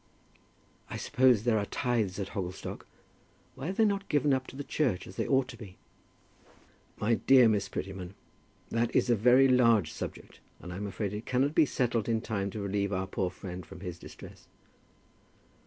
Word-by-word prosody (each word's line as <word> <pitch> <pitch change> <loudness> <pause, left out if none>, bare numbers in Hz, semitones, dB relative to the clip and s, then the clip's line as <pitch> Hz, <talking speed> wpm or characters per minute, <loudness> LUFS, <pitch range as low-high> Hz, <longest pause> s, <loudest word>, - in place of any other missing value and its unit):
"I - - -5
suppose 125 -4 +3
there 115 -2 +2
are 100 - -2
tithes 115 -8 -1
at 100 -2 -4
Hogglestock. 90 -2 -6 0.7
Why 135 +3 -6
are - - -2
they 220 +3 +3
not 200 -1 -1
given 145 -1 +3
up 130 -1 -1
to - - -10
the 145 - -5
church, 125 - -1
as 95 - -11
they - - -2
ought 135 -2 +2
to 120 - -9
be?" 100 -5 -11 1.2
"My 110 +3 +1
dear 130 +1 +6
Miss 105 -3 +1
Prettyman, 95 -1 -6 0.6
that 115 0 0
is 125 - +3
a - - +5
very 125 +5 +5
large 115 -9 +4
subject, - - -7 0.2
and 90 - -8
I - - -6
am 105 +1 -4
afraid 100 +1 -3
it 105 +2 -6
cannot 135 +3 +1
be 160 -2 +4
settled 120 -4 0
in 115 -1 +2
time 100 -3 -2
to 105 +1 -6
relieve 100 0 -1
our 95 -1 -1
poor 95 -1 -2
friend 90 0 -8
from 90 - -12
his 90 -3 -6
distress." - - -12
110 Hz, 190 wpm, -30 LUFS, 95-130 Hz, 1.2 s, dear